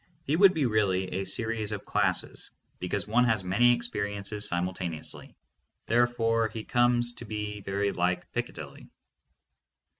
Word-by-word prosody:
He 150 Hz, -, +1 dB
would 190 Hz, +2 st, +6 dB
be 150 Hz, -4 st, +1 dB
really 100 Hz, -5 st, +1 dB
a 95 Hz, -, -3 dB
series 110 Hz, +2 st, -2 dB
of 105 Hz, -, -5 dB
classes, -, -, +1 dB, 0.3 s
because 90 Hz, +1 st, -2 dB
one 120 Hz, +4 st, +3 dB
has 110 Hz, -5 st, +1 dB
many 100 Hz, +7 st, +4 dB
experiences 105 Hz, -3 st, -2 dB
simultaneously. 85 Hz, -2 st, -4 dB, 0.5 s
Therefore 115 Hz, -1 st, +2 dB
he 110 Hz, 0 st, -7 dB
comes 120 Hz, 0 st, +3 dB
to 120 Hz, -, -10 dB
be 105 Hz, -1 st, -4 dB
very 100 Hz, +1 st, -1 dB
like 90 Hz, 0 st, -1 dB
Picca -, -, -3 dB
dilly. -, -, -10 dB
105 Hz, 140 wpm, -28 LUFS, 95-120 Hz, 0.5 s, would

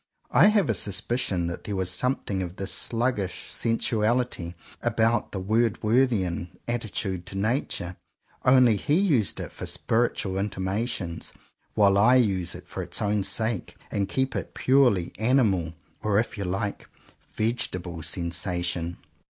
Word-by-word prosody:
I -, -, +7 dB
have 210 Hz, -6 st, +3 dB
a 115 Hz, -, +2 dB
suspicion 100 Hz, -1 st, 0 dB
that 85 Hz, 0 st, -5 dB
there 105 Hz, -, -3 dB
was 95 Hz, -1 st, +1 dB
something 100 Hz, -1 st, 0 dB
of 90 Hz, -1 st, -5 dB
this 95 Hz, -1 st, -2 dB
sluggish 115 Hz, -5 st, -2 dB
sensuality 115 Hz, -5 st, 0 dB, 0.3 s
about 115 Hz, -1 st, +1 dB
the 95 Hz, -, -3 dB
Word 110 Hz, +4 st, +1 dB
worthian 105 Hz, -7 st, +1 dB, 0.2 s
attitude 105 Hz, -6 st, -2 dB
to 95 Hz, -, -5 dB
Nature; 100 Hz, -5 st, -1 dB, 0.5 s
only 125 Hz, -4 st, +5 dB
he 145 Hz, -, +1 dB
used 150 Hz, -, +2 dB
it -, -, -5 dB
for -, -, -7 dB
spiritual 110 Hz, -4 st, 0 dB
intimations, 95 Hz, -2 st, -3 dB, 0.4 s
while 100 Hz, -2 st, +5 dB
I 120 Hz, +5 st, +6 dB
use 95 Hz, -8 st, +2 dB
it -, -, -11 dB
for -, -, -5 dB
its -, -, -2 dB
own 105 Hz, 0 st, +1 dB
sake 110 Hz, +1 st, -1 dB, 0.2 s
and 100 Hz, -1 st, -1 dB
keep 130 Hz, 0 st, -1 dB
it -, -, +2 dB
a -, -, -13 dB
purely 125 Hz, -10 st, +3 dB
animal, 110 Hz, -9 st, +2 dB, 0.3 s
or 105 Hz, -2 st, +1 dB
if 115 Hz, -, -2 dB
you 100 Hz, -, -4 dB
like, 100 Hz, +3 st, -3 dB, 0.5 s
vegetable 90 Hz, -7 st, -1 dB
sensation. 85 Hz, +1 st, -1 dB
105 Hz, 140 wpm, -26 LUFS, 90-120 Hz, 0.5 s, I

